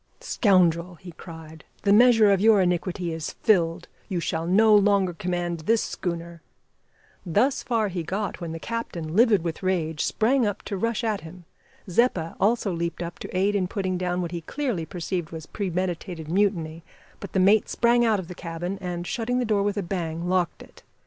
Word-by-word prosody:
"Scoundrel!" 180 - +2
he 175 +1 -11
cried, 160 -2 -11 0.2
"the 200 - +4
measure 225 -2 +6
of 195 -1 +2
your 220 -1 +6
iniquity 180 -1 -1
is 160 -1 -5
filled. 175 -4 +2 0.2
You 185 -3 -1
shall 165 0 -2
no 215 +4 +5
longer 200 -3 +4
command 175 -2 -3
this 220 +8 +1
schooner 170 -2 -5 0.4
" - - -35
Thus 245 - +1
far 225 -3 0
he 180 -2 -3
got 190 +3 -4
when 170 -1 -4
the 165 - -5
captain, 170 -6 -5
livid 220 -5 +4
with 165 -2 -4
rage, 165 -5 -1
sprang 250 +4 +2
up 205 -3 -2
to 200 - -4
rush 230 +4 -1
at 215 -3 -1
him. 170 +2 -12 0.4
Zeppa 180 -4 +1
also 215 -1 +2
leaped 170 +1 -3
up 170 0 -7
to - - -5
aid 200 +2 +2
in 190 -3 0
putting 185 -1 -2
down 180 0 -1
what 170 - -4
he 170 -1 -4
clearly 215 - -3
perceived 175 -2 -4
was 160 -1 -8
premeditated 180 -4 -4
mutiny, 170 -5 0 0.4
but 200 - -9
the 190 - +2
mate 200 +3 +4
sprang 240 +1 +3
out 220 -3 +2
of 180 - -7
the 180 - -7
cabin, 175 +2 -5
and, 175 -1 -4
shutting 245 +5 -2
the 250 - 0
door 210 -3 +1
with 205 +1 -1
a 200 - -1
bang, 170 -2 -3
locked 180 -2 0
it. - - -18
185 Hz, 190 wpm, -25 LUFS, 170-210 Hz, 0.4 s, measure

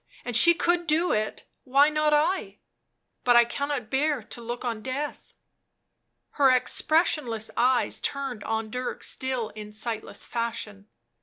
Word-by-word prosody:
And 245 - -4
she 340 +9 +7
could 345 0 +1
do 320 +4 +2
it 215 0 -2
— - - -51
why 285 +2 +6
not 305 0 +1
I? 315 +6 +1 0.7
But 245 -1 +4
I 240 0 +7
cannot 280 -2 -4
bear 285 -2 +1
to 235 - -9
look 240 +2 -5
on 230 -3 -3
death." 270 +5 -5 1.0
Her 275 -2 +4
expressionless 255 -3 +1
eyes 250 +1 +2
turned 275 -6 -3
on 220 -1 -3
Dirk 250 +1 -4
still 255 -4 -1
in 210 0 -9
sightless 220 +1 -5
fashion. 220 -4 -4
250 Hz, 145 wpm, -26 LUFS, 225-295 Hz, 1.0 s, she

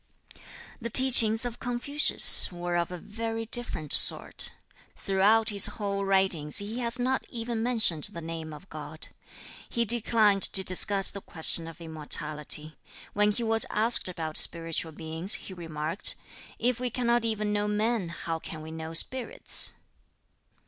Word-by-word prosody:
The 235 - -5
teachings 235 -2 +5
of 240 -1 -7
Confucius 245 +2 +6
were 175 0 -6
of 170 -1 -2
a 180 - -8
very 225 +4 -7
different 220 - 0
sort. - - +2 0.4
Throughout 210 +4 0
his 200 -2 +4
whole 200 -2 -4
writings 190 -6 0
he 210 +4 -2
has 235 0 -1
not 255 +1 -3
even 230 -1 -5
mentioned 225 -10 0
the 170 - -7
name 165 -1 -8
of 150 +6 -13
God. - - -9 0.6
He 235 -1 -2
declined 215 -3 +2
to 190 - 0
discuss 195 +2 +1
the 200 - -10
question 165 -1 -3
of 165 - -13
immortality. 150 -1 -7 0.3
When 210 0 0
he 235 +3 -5
was 225 -1 +1
asked 220 -2 +3
about 160 -3 -6
spiritual 165 -1 +2
beings, 160 +5 +1
he 190 - -10
remarked, 165 0 -2 0.4
"If 245 0 -2
we 250 0 -4
cannot 240 -1 -1
even 215 -2 -3
know 205 0 -2
men, 210 -2 -3
how 165 -1 -6
can 155 -1 -10
we 160 - -11
know 160 0 -9
spirits?" 260 - -1
200 Hz, 150 wpm, -26 LUFS, 165-230 Hz, 0.6 s, Confucius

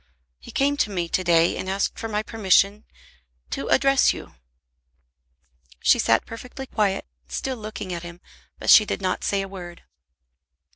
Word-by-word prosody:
He - - -14
came 285 +1 +1
to 220 - +1
me 175 -4 -2
to 185 - 0
day 170 -1 +3
and 185 - -5
asked 195 +1 -1
for 225 - -4
my 210 -1 -2
permission 205 -1 +2 0.7
to 140 - -3
address 275 0 +4
you." - - -10 1.5
She - - +4
sat 115 - +2
perfectly 250 +4 -8
quiet, 205 -6 -1 0.2
still 260 -1 -4
looking 215 -4 -6
at 170 - -4
him, 175 0 -10 0.4
but - - +2
she 215 - +9
did - - -3
not 185 -1 -1
say 200 -1 0
a - - -6
word. 175 -3 -10
200 Hz, 160 wpm, -24 LUFS, 180-225 Hz, 1.5 s, she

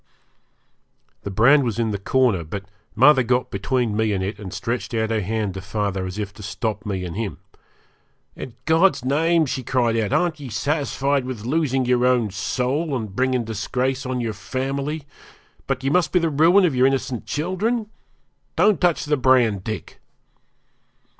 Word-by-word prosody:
The - - -5
brand 125 +9 +5
was 115 -4 -2
in 115 -2 0
the 100 - -3
corner, 115 -4 +2
but 95 +5 -6 0.3
mother 135 +3 +6
got 125 0 0
between 115 +2 -1
me 110 -1 +1
and 95 -1 -1
it, 100 +1 -4
and 100 -3 -7
stretched 115 +5 -3
out 110 0 0
her 110 -1 +1
hand 105 0 -2
to 95 - -6
father 100 -1 -2
as 90 +2 -7
if 105 -2 -4
to 105 - -13
stop 105 +1 -4
me 95 -3 -2
and 85 - -6
him. 110 -1 -3 1.0
'In 125 - -8
God's 160 -3 +3
name,' 160 +4 +2
she 130 -1 -3
cried 120 -2 +1
out, 110 -3 0
'aren't 170 -3 +1
ye 140 -3 -7
satisfied 140 +3 0
with 125 -4 -6
losing 135 -2 +1
your 125 0 +2
own 120 -5 +2
soul 130 - -1
and 110 -5 -6
bringing 130 0 +1
disgrace 125 +5 -2
upon 130 -1 -2
your 115 -2 -2
family, 135 +7 -3 0.6
but 135 -1 -2
ye 135 - 0
must 180 +2 +2
be - - +3
the 165 -2 +1
ruin 170 +7 +5
of 155 -7 +1
your 125 +1 +5
innocent 130 -3 -2
children? 195 +9 -1 0.7
Don't 200 +4 +3
touch 175 -3 +2
the 150 0 +1
brand, 125 -7 +3
Dick!' 110 +1 -6
125 Hz, 175 wpm, -22 LUFS, 110-140 Hz, 1.0 s, mother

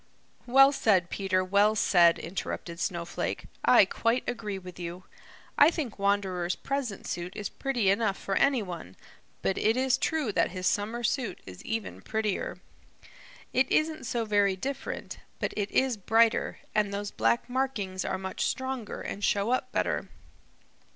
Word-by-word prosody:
"Well 270 +3 +7
said, 195 -10 +2
Peter, 185 -2 0
well 200 +3 +3
said," 175 -5 +5
interrupted 170 -1 -5
Snowflake. 170 -3 -3 0.2
"I - - +7
quite 230 +2 0
agree 220 -5 -3
with 180 -1 -10
you. 175 +1 -6 0.6
I 290 - +9
think 290 - -4
Wanderer's 195 -3 0
present 275 -7 -3
suit 175 +1 -4
is 210 - -4
pretty 255 -7 -1
enough 200 -1 +1
for 195 - -4
any 275 -2 +3
one, 170 - -8 0.5
but 190 - 0
it 220 +3 +2
is 265 0 +2
true 305 -8 0
that - - +2
his 185 0 -5
summer 220 +5 0
suit 235 -5 -1
is 90 -1 -10
even 225 -2 -4
prettier. 220 -3 -2 1.0
It 260 0 +2
isn't 310 -2 +1
so 235 -1 -1
very 205 -2 +3
different, 270 +9 -5 0.2
but - - -2
it 205 -1 -1
is 260 -3 +1
brighter, 225 +3 +2 0.2
and 210 -1 +1
those 200 0 -4
black 115 - +1
markings 235 -8 -2
are 190 - -2
much 190 0 -2
stronger 260 -4 -3
and 205 - -5
show 200 +3 +2
up 255 - 0
better. - - -1
205 Hz, 155 wpm, -28 LUFS, 185-245 Hz, 1.0 s, I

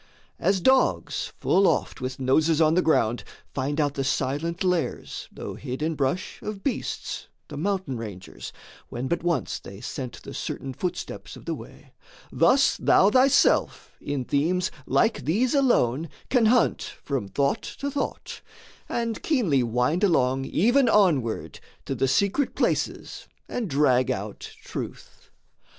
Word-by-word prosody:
As 195 -1 +2
dogs 260 +6 +2
full 195 0 +3
oft - - 0
with 130 +1 -4
noses 155 +5 +2
on 155 -1 +4
the 180 - +4
ground, 120 -8 +2 0.3
Find 140 +3 -2
out 145 -2 +1
the 135 - -2
silent 150 +7 -1
lairs, 180 -8 -2
though - - -7
hid 130 +1 -5
in 160 +1 0
brush, 145 +5 -2
Of 210 -2 -6
beasts, 275 - -3 0.2
the 150 - -7
mountain 185 -5 -1
rangers, 105 -5 -8 0.4
when 125 +2 -4
but 170 - -1
once 170 -8 -1
They 95 0 -11
scent 125 +2 -6
the - - -8
certain 135 -1 -5
footsteps 180 +6 -5
of - - -13
the - - -2
way, - - -12 0.4
Thus 275 +2 +4
thou 195 +2 +4
thyself 265 +3 +3
in 140 -3 -3
themes 180 +8 +1 0.2
like 225 - +2
these 220 - +1
alone 165 - +2 0.2
Can 245 -4 +4
hunt 245 +1 +3 0.2
from 135 -8 -2
thought 140 - 0
to 280 0 -5
thought, 280 - -4 0.5
and 230 -2 -2
keenly 205 - +2
wind 125 - 0
Along 135 -8 +2
even 240 - +3
onward 160 - +2 0.3
to - - -2
the 135 - +1
secret 200 - +1
places - - -1 0.2
And 230 -6 -3
drag 130 -3 +3
out 105 -4 -4
truth. - - -8
160 Hz, 145 wpm, -25 LUFS, 130-200 Hz, 0.5 s, on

